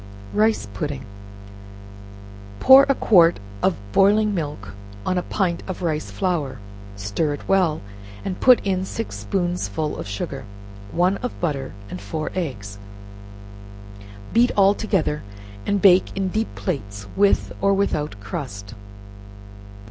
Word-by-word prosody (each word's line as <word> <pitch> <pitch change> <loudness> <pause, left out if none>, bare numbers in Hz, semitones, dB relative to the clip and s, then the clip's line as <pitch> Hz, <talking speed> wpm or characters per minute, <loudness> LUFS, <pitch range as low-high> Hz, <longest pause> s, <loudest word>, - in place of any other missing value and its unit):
Rice 215 - +2
Pudding. 135 +4 -4 1.5
Pour 270 +1 +8
a 275 - +4
quart 175 -8 +5 0.2
of 190 - +2
boiling 205 - +4
milk 145 - -4 0.4
on 185 - 0
a - - -2
pint 180 -2 -1
of 185 - -5
rice 155 -2 -1
flour, 170 -9 -2 0.4
stir 105 +10 -1
it - - -13
well, 180 -5 +2 0.4
and 185 -2 -3
put 255 -2 +6
in 190 -1 0
six 225 +4 -5
spoonsful 175 -5 -2
of - - -6
sugar, 130 +6 -5 0.5
one 180 +3 +2
of 250 - -5
butter, 140 -6 -2
and 90 -2 -7
four 155 +10 -4
eggs, 105 - -4 1.5
beat 240 +2 +5
all 200 0 +6
together, 190 -8 -1 0.5
and 200 -1 0
bake 190 0 +5
in 190 -1 0
deep 220 +4 -2
plates, 105 - -4
with 200 0 +2
or 200 +1 +3
without 150 - -1
crust. 100 0 -6
175 Hz, 125 wpm, -22 LUFS, 140-195 Hz, 1.5 s, Pour